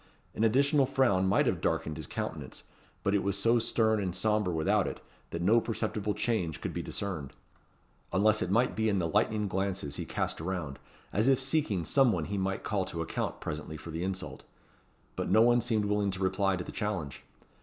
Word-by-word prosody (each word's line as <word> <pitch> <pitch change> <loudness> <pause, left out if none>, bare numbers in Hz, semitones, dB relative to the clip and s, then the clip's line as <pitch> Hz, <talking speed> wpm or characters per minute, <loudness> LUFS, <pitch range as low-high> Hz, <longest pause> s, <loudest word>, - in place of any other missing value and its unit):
An 110 - -1
additional 140 +4 +4
frown 100 -9 +2
might 100 - +3
have - - 0
darkened 80 - -1
his - - -7
countenance; - - -5 0.4
but 100 - +1
it 100 - +3
was 100 0 -1
so 115 +4 +3
stern 110 -2 +1
and 90 -2 -2
sombre, 105 -1 +1
without 95 +5 +2
it, - - -5 0.3
that 85 +1 -4
no 115 +5 +5
perceptible 105 -2 -2
change 90 -10 -1
could - - -4
be - - -2
discerned; 85 -9 -4 0.8
unless 105 +3 +3
it - - -1
might 120 +6 +2
be 110 0 +1
in 100 - +1
the 85 -3 0
lightning 105 +5 +1
glances 95 -6 -2
he - - -4
cast - - -2
around, 85 -5 -4 0.3
as 110 +5 +2
if 135 -2 +4
seeking 130 - 0
some 135 - +4
one - - -1
he 100 - -3
might 95 0 -2
call 100 -2 0
to 85 -3 -4
account - - -3
presently 75 +1 -5
for 80 +2 -9
the 80 +2 -3
insult. 95 0 -5 0.7
But - - -2
no 110 +4 +6
one 120 0 +4
seemed 110 -3 +1
willing 105 0 +1
to 95 -1 -4
reply 95 +1 +1
to 90 - -4
the - - -8
challenge. 95 -11 -3
100 Hz, 200 wpm, -30 LUFS, 90-110 Hz, 0.8 s, no